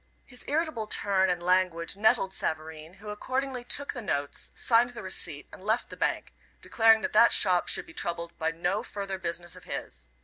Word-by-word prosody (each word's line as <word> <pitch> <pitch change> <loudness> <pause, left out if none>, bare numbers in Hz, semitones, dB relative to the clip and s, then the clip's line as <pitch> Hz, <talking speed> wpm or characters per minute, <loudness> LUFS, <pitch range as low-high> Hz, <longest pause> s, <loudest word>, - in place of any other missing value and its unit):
His 250 -1 -11
irritable 300 -7 -1
turn 190 -2 +2
and 175 -1 -1
language 180 -2 +1
nettled 200 -2 +2
Savareen, 160 +1 -3
who 210 +1 -8
accordingly 255 +4 -3
took 285 +3 -1
the 245 - -6
notes, 145 -8 -3
signed 235 0 +3
the 230 - -7
receipt 165 -5 -2
and - - -11
left 220 +4 0
the - - -7
bank, - - -2 0.3
declaring 225 -1 +4
that - - -3
"that 235 +2 +6
shop" 180 -3 +4
should - - +2
be - - -14
troubled 170 0 -3
by 160 0 +1
no 170 +2 -1
further 195 -2 -5
business 175 -1 -4
of - - -14
his. 60 -1 -6
190 Hz, 190 wpm, -28 LUFS, 170-225 Hz, 0.3 s, that